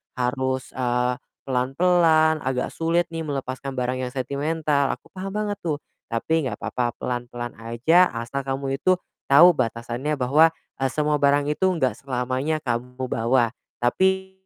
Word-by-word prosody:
harus, 130 Hz, +1 st, -1 dB
eee, 125 Hz, 0 st, 0 dB, 0.2 s
pelan-pelan, 160 Hz, +4 st, +3 dB
agak 130 Hz, -1 st, -1 dB
sulit 170 Hz, +1 st, 0 dB
nih 165 Hz, -1 st, -4 dB
melepaskan 135 Hz, -1 st, -4 dB
barang 125 Hz, 0 st, -1 dB
yang 125 Hz, -1 st, -3 dB
sentimental. 140 Hz, +2 st, 0 dB
Aku -, -, -24 dB
paham 195 Hz, +1 st, -6 dB
banget 210 Hz, -1 st, -1 dB
tuh. 155 Hz, -4 st, -2 dB, 0.3 s
Tapi 145 Hz, +5 st, 0 dB
nggak 105 Hz, -, -3 dB
papa, 120 Hz, +1 st, -2 dB
pelan-pelan 120 Hz, -1 st, -4 dB
aja 125 Hz, +11 st, +3 dB
asal 130 Hz, +4 st, -4 dB
kamu 135 Hz, +1 st, -2 dB
itu 185 Hz, +5 st, +3 dB, 0.3 s
tahu 165 Hz, +6 st, +8 dB
batasannya 120 Hz, +6 st, -2 dB
bahwa, 150 Hz, +5 st, +4 dB, 0.3 s
eee, 135 Hz, -, +2 dB
semua 150 Hz, -1 st, +1 dB
barang 145 Hz, +1 st, +3 dB
itu 190 Hz, +5 st, +1 dB
nggak 130 Hz, -, 0 dB
selamanya 130 Hz, +4 st, -2 dB
kamu 125 Hz, +1 st, -3 dB
bawa. 115 Hz, 0 st, +2 dB, 0.3 s
Tapi 190 Hz, +9 st, +2 dB
135 Hz, 140 wpm, -24 LUFS, 125-160 Hz, 0.3 s, tahu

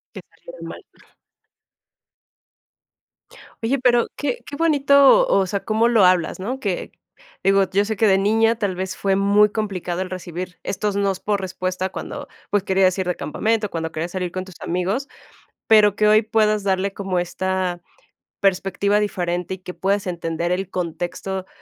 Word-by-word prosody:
Que -, -, -7 dB
salieran -, -, -12 dB
mal. -, -, -9 dB, 2.8 s
Oye, 250 Hz, +5 st, +1 dB
pero 245 Hz, -2 st, +3 dB
qué 275 Hz, -4 st, -2 dB
qué 285 Hz, -, -7 dB
bonito, 285 Hz, -, +5 dB
o 195 Hz, -, +3 dB
sea, 195 Hz, +2 st, -3 dB
cómo 220 Hz, +2 st, +2 dB
lo 230 Hz, -4 st, +4 dB
hablas, 180 Hz, -1 st, +3 dB
¿no? 245 Hz, +8 st, -4 dB
Que 200 Hz, -8 st, -3 dB, 0.5 s
digo, 195 Hz, 0 st, +3 dB
yo 200 Hz, +1 st, +2 dB
sé 220 Hz, -, -2 dB
que 220 Hz, +2 st, +3 dB
de 190 Hz, -1 st, +5 dB
niña 225 Hz, +3 st, +3 dB
tal 200 Hz, -5 st, -1 dB
vez 185 Hz, +1 st, -4 dB
fue 195 Hz, -1 st, +1 dB
muy 205 Hz, +2 st, +4 dB
complicado 190 Hz, -5 st, -3 dB
el 185 Hz, -, -4 dB
recibir 180 Hz, -1 st, -6 dB
estos 205 Hz, +1 st, -2 dB
nos 200 Hz, -2 st, 0 dB
por 205 Hz, -1 st, -1 dB
respuesta 185 Hz, 0 st, -3 dB
cuando, -, -, -7 dB, 0.2 s
pues, 205 Hz, -2 st, +1 dB
querías 190 Hz, -1 st, +2 dB
ir 190 Hz, -, -1 dB
de 180 Hz, -, 0 dB
campamento, 215 Hz, +6 st, -1 dB
cuando 160 Hz, -2 st, -4 dB
querías 165 Hz, +2 st, -4 dB
salir 180 Hz, -2 st, -3 dB
con 185 Hz, 0 st, -4 dB
tus 185 Hz, -3 st, -13 dB
amigos. 190 Hz, +10 st, -2 dB, 0.6 s
Pero 210 Hz, -2 st, +6 dB
que 210 Hz, 0 st, +3 dB
hoy 215 Hz, +1 st, +5 dB
puedas 215 Hz, -1 st, +1 dB
darle 195 Hz, 0 st, 0 dB
como 190 Hz, -2 st, -2 dB
esta 180 Hz, 0 st, -2 dB, 0.6 s
perspectiva 195 Hz, +1 st, +1 dB
diferente 180 Hz, -3 st, -2 dB
y -, -, -14 dB
que 180 Hz, -1 st, -9 dB
puedas 200 Hz, +1 st, 0 dB
entender 170 Hz, -1 st, -3 dB
el 185 Hz, +1 st, -2 dB
contexto, 185 Hz, +2 st, -4 dB
195 Hz, 165 wpm, -21 LUFS, 185-215 Hz, 2.8 s, Pero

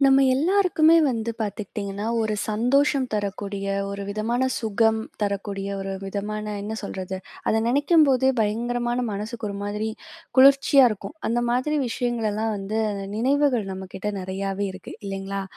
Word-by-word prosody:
நம்ம 270 Hz, 0 st, +6 dB
எல்லாருக்குமே 335 Hz, +1 st, +4 dB
வந்து 230 Hz, -2 st, -1 dB
பாத்துக்கிட்டிங்கன்னா, 205 Hz, -1 st, -4 dB, 0.2 s
ஒரு 215 Hz, -1 st, 0 dB
சந்தோஷம் 260 Hz, +5 st, +2 dB
தரக்கூடிய, 200 Hz, -1 st, -3 dB, 0.2 s
ஒரு 200 Hz, 0 st, -5 dB
விதமான 220 Hz, +5 st, -1 dB
சுகம் 220 Hz, 0 st, +2 dB, 0.2 s
தரக்கூடிய 200 Hz, -1 st, -2 dB
ஒரு 195 Hz, 0 st, -4 dB
விதமான 210 Hz, +2 st, -4 dB
என்ன 210 Hz, +2 st, -4 dB
சொல்றது? 190 Hz, -1 st, -5 dB, 0.3 s
அத -, -, +2 dB
நெனைக்கும்போதே 280 Hz, -1 st, +4 dB
பயங்கரமான 240 Hz, +3 st, 0 dB
மனசுக்கு 215 Hz, +3 st, -4 dB
ஒரு 200 Hz, -, -5 dB
மாதிரி 210 Hz, +2 st, -2 dB, 0.5 s
குளிர்ச்சியா 275 Hz, 0 st, +7 dB
இருக்கும். 215 Hz, +7 st, -6 dB
அந்த 240 Hz, +1 st, +1 dB
மாதிரி 255 Hz, +5 st, +1 dB
விஷயங்களெல்லாம் 225 Hz, -3 st, -1 dB
வந்து 200 Hz, +3 st, -2 dB, 0.4 s
நினைவுகள் 265 Hz, -1 st, +2 dB
நம்மகிட்ட 190 Hz, +2 st, -5 dB
நெறையாவே 195 Hz, +2 st, -3 dB
இருக்கு 185 Hz, -1 st, -10 dB
இல்லைங்களா? 195 Hz, 0 st, -4 dB
215 Hz, 125 wpm, -24 LUFS, 200-250 Hz, 0.5 s, குளிர்ச்சியா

